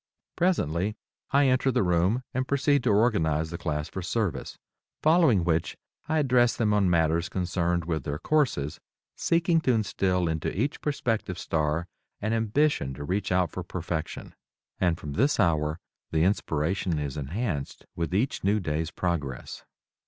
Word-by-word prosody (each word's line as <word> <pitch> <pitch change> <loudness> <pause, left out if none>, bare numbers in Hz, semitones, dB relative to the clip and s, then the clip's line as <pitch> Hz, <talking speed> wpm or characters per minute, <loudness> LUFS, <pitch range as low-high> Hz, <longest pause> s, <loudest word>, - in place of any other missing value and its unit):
Presently, 105 - +1 0.3
I 140 +1 +4
enter 130 0 +3
the 115 - +2
room 90 +8 +2
and 130 +1 -1
proceed 140 -1 +2
to - - +3
organize 85 -8 +2
the 85 - -4
class 75 -2 -2
for 95 - -6
service, 100 +1 -2 0.5
following 155 - +5
which 80 -1 0 0.3
I 160 - +2
address 125 -5 +3
them 110 -4 +2
on 100 -3 +3
matters 85 0 +2
concerned 90 -2 -1
with 80 -4 -2
their 75 +2 -3
courses, 125 - 0 0.4
seeking 170 0 +2
to 130 - +2
instill 95 -5 +1
into 80 -1 -1
each 140 +5 -1
prospective 115 - -1
star 80 +1 -1 0.3
an 110 +2 -1
ambition 115 - +1
to 75 - -7
reach 95 +6 -2
out 90 -3 +2
for 90 - -5
perfection. 85 -2 -5 0.5
And 90 -3 +2
from 75 -3 -6
this 140 - +2
hour 80 -4 +2 0.3
the 80 0 +1
inspiration 85 -2 0
is 75 -3 -3
enhanced 75 - -3
with 85 0 -2
each 105 +9 0
new 100 +3 +2
day's 80 -3 -2
progress. 80 -8 -3
90 Hz, 150 wpm, -27 LUFS, 80-120 Hz, 0.5 s, following